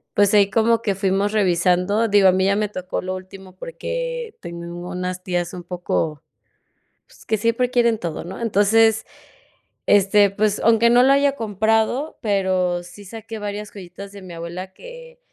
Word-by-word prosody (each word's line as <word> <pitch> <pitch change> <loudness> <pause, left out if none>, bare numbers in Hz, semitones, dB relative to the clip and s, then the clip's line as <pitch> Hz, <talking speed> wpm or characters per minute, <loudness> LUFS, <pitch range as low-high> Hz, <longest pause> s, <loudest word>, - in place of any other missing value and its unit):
pues 205 0 +3
ahí 200 -1 +5
como 225 +2 +2
que 205 -4 -1
fuimos 195 +1 0
revisando 185 +2 +2
Digo, 200 -2 +5
a - - +3
mí 190 0 +1
ya 200 +1 +2
me 210 0 0
tocó 185 -2 -4
lo 185 0 -3
último 185 0 -11
porque - - -5
tengo 170 0 -7
unas 180 0 -4
tías 175 -1 -2
un 180 - -7
poco 170 -3 -3 0.9
pues - - -20
que 220 - 0
siempre 230 +3 0
quieren 235 -3 +2
todo, 170 -5 -5
¿no? 185 - -8
Entonces, 220 0 +3 0.8
este, 200 0 +4
pues 210 +1 0
aunque 230 +1 +4
no 240 +1 +6
lo 270 - +5
haya 280 0 +3
comprado, 225 +6 0
pero 185 -4 0
sí 180 +4 -13
saqué 225 +2 -8
varias 205 0 -5
joyitas 195 +1 -10
de 200 -1 -11
mi 180 -2 -10
abuela 175 +3 -7
que - - -12
200 Hz, 170 wpm, -21 LUFS, 185-225 Hz, 0.9 s, no